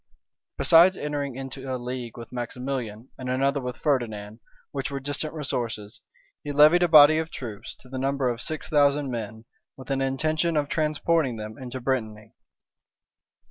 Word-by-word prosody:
Besides 175 Hz, +3 st, +6 dB
entering 145 Hz, -3 st, -3 dB
into 135 Hz, 0 st, -6 dB
a 130 Hz, -, -1 dB
league 125 Hz, -1 st, -6 dB
with 115 Hz, -, -9 dB
Maximilian, 125 Hz, -2 st, -4 dB
and 130 Hz, -1 st, -5 dB
another 135 Hz, +2 st, +1 dB
with 125 Hz, -1 st, -5 dB
Ferdinand, 110 Hz, -7 st, -2 dB, 0.3 s
which 135 Hz, -1 st, -3 dB
were 140 Hz, -1 st, -4 dB
distant 145 Hz, +3 st, -2 dB
resources, 115 Hz, -8 st, -3 dB, 0.4 s
he 145 Hz, -, -4 dB
levied 150 Hz, +5 st, +6 dB
a 175 Hz, -, +4 dB
body 155 Hz, 0 st, +8 dB
of 160 Hz, 0 st, -3 dB
troops, 115 Hz, -10 st, -7 dB
to 130 Hz, -, -15 dB
the 130 Hz, 0 st, -5 dB
number 135 Hz, 0 st, 0 dB
of 120 Hz, -1 st, -2 dB
six 155 Hz, -, -4 dB
thousand 145 Hz, -2 st, +2 dB
men, 110 Hz, -1 st, -6 dB, 0.3 s
with 135 Hz, +1 st, -8 dB
an 135 Hz, 0 st, 0 dB
intention 155 Hz, +5 st, 0 dB
of 145 Hz, -1 st, 0 dB
transporting 155 Hz, -3 st, +1 dB
them 110 Hz, 0 st, -7 dB
into 130 Hz, 0 st, -7 dB
Brittany. 110 Hz, -4 st, -3 dB
135 Hz, 160 wpm, -25 LUFS, 120-145 Hz, 0.4 s, body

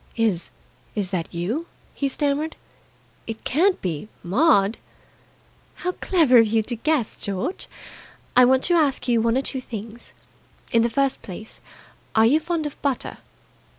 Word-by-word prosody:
"Is 215 Hz, -7 st, 0 dB, 0.5 s
is 200 Hz, -3 st, -1 dB
that 175 Hz, -4 st, -2 dB
you?" 215 Hz, -, -3 dB, 0.3 s
he 280 Hz, -, -1 dB
stammered. 290 Hz, +3 st, -1 dB, 0.7 s
"It 225 Hz, -1 st, -6 dB
can't 360 Hz, +8 st, +2 dB
be 170 Hz, 0 st, -3 dB, 0.2 s
Maud!" 205 Hz, -, +3 dB, 1.0 s
"How 360 Hz, -, -2 dB
clever 320 Hz, -10 st, +4 dB
of 225 Hz, -, +5 dB
you 220 Hz, +1 st, +2 dB
to 240 Hz, +3 st, -4 dB
guess. 275 Hz, -1 st, 0 dB
George, 205 Hz, -, -4 dB, 0.7 s
I 250 Hz, -, +8 dB
want 260 Hz, +1 st, +4 dB
to 355 Hz, -, +3 dB
ask 300 Hz, -7 st, +2 dB
you 235 Hz, -2 st, +3 dB
one 230 Hz, +2 st, +2 dB
or 270 Hz, -, 0 dB
two 265 Hz, -1 st, -2 dB
things. 225 Hz, 0 st, -9 dB, 0.6 s
In 230 Hz, -, +4 dB
the 235 Hz, -, +2 dB
first 275 Hz, +2 st, +1 dB
place, 215 Hz, +3 st, -8 dB, 0.5 s
are 220 Hz, 0 st, +6 dB
you 280 Hz, +7 st, +5 dB
fond 325 Hz, -1 st, -2 dB
of 295 Hz, -, -6 dB
butter?" 275 Hz, -3 st, -2 dB
245 Hz, 150 wpm, -23 LUFS, 220-295 Hz, 1.0 s, I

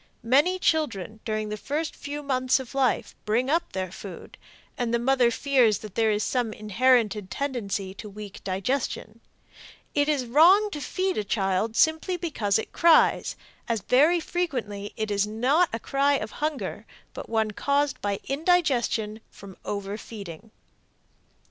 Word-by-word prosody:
Many 285 Hz, +10 st, +3 dB
children 230 Hz, -, -1 dB
during 215 Hz, -1 st, -2 dB
the 210 Hz, -, -4 dB
first 295 Hz, +8 st, -3 dB
few 290 Hz, +1 st, -6 dB
mouths 255 Hz, -1 st, +1 dB
of 260 Hz, -1 st, -8 dB
life 270 Hz, -3 st, +1 dB
bring 240 Hz, +6 st, +1 dB
up 335 Hz, +2 st, 0 dB
their 185 Hz, -2 st, -3 dB
food, 190 Hz, -1 st, -10 dB, 0.4 s
and 240 Hz, -2 st, -2 dB
the 235 Hz, -, +3 dB
mother 250 Hz, 0 st, +3 dB
fears 245 Hz, -3 st, +3 dB
that 215 Hz, -3 st, -10 dB
there 225 Hz, 0 st, +2 dB
is 210 Hz, 0 st, +1 dB
some 240 Hz, -4 st, -1 dB
inherited 215 Hz, -2 st, +2 dB
tendency 210 Hz, -8 st, -3 dB
to 210 Hz, +2 st, -9 dB
weak 205 Hz, 0 st, -10 dB
digestion. 220 Hz, +2 st, -3 dB, 0.7 s
It 290 Hz, 0 st, +2 dB
is 280 Hz, -4 st, +1 dB
wrong 355 Hz, -, +5 dB
to 295 Hz, -, -5 dB
feed 375 Hz, -, -1 dB
a -, -, -1 dB
child 195 Hz, +2 st, 0 dB
simply 320 Hz, +6 st, +2 dB
because 235 Hz, -, 0 dB
it 220 Hz, -, -5 dB
cries, 335 Hz, -1 st, +4 dB, 0.3 s
as 230 Hz, -3 st, -1 dB
very 295 Hz, -, +4 dB
frequently 250 Hz, -, -3 dB
it 215 Hz, -1 st, -2 dB
is 200 Hz, 0 st, +1 dB
not 260 Hz, +11 st, +2 dB
a 225 Hz, -, -2 dB
cry 275 Hz, +4 st, +1 dB
of -, -, -3 dB
hunger, 305 Hz, -2 st, -3 dB, 0.3 s
but -, -, -8 dB
one 220 Hz, -1 st, +1 dB
caused 280 Hz, +6 st, 0 dB
by 200 Hz, -1 st, -1 dB
indigestion 270 Hz, -9 st, +1 dB
from 195 Hz, -2 st, -12 dB
overfeeding. 200 Hz, -1 st, -6 dB
235 Hz, 150 wpm, -26 LUFS, 210-285 Hz, 0.7 s, wrong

